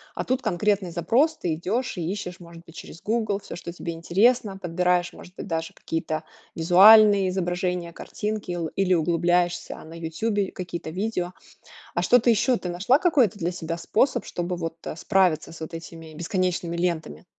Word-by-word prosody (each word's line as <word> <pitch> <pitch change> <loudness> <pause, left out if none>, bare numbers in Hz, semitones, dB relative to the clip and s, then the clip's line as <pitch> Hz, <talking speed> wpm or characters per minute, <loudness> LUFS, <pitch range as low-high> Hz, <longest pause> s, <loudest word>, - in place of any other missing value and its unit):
А - - -2
тут 260 +1 -1
конкретный 195 -1 0
запрос. 240 - +2
Ты 165 -3 -2
идешь 215 +9 -2
и 170 -1 -2
ищешь, 190 -2 -5
может 170 -1 -13
быть, 165 - -15
через 165 - -10
"Гугл" 215 -2 -1
всё, 175 - -9
что 170 0 -7
тебе 170 -1 -5
интересно. 195 +6 +2
Подбираешь, 180 0 0
может 180 - -14
быть, - - -7
даже 165 -2 -3
какие-то 160 -1 -3 0.3
визуальные 200 +4 +7
изображения, 180 -1 -2
картинки 210 +2 -5
ил 175 -2 -2
или 190 -1 +3
углубляешься 175 +1 +1
на 160 - -12
"Ютубе", 190 +5 -2
какие-то 175 -3 -6
видео. 180 0 -3 0.6
А - - 0
что 245 - +5
ты 240 - +1
ещё, 235 +3 +2
ты 180 - -6
нашла 190 +10 +2
какой-то 265 - +2
для 175 +1 -1
себя 165 -1 -4
способ, 240 +10 +1
чтобы 175 0 -3
вот, 165 -1 -4
э, - - -4
справиться 180 -4 +1
с 165 - -12
вот 160 +2 -7
этими 165 -1 -9
бесконечными 175 0 -1
лентами? 170 -1 -2
180 Hz, 175 wpm, -25 LUFS, 170-205 Hz, 0.6 s, визуальные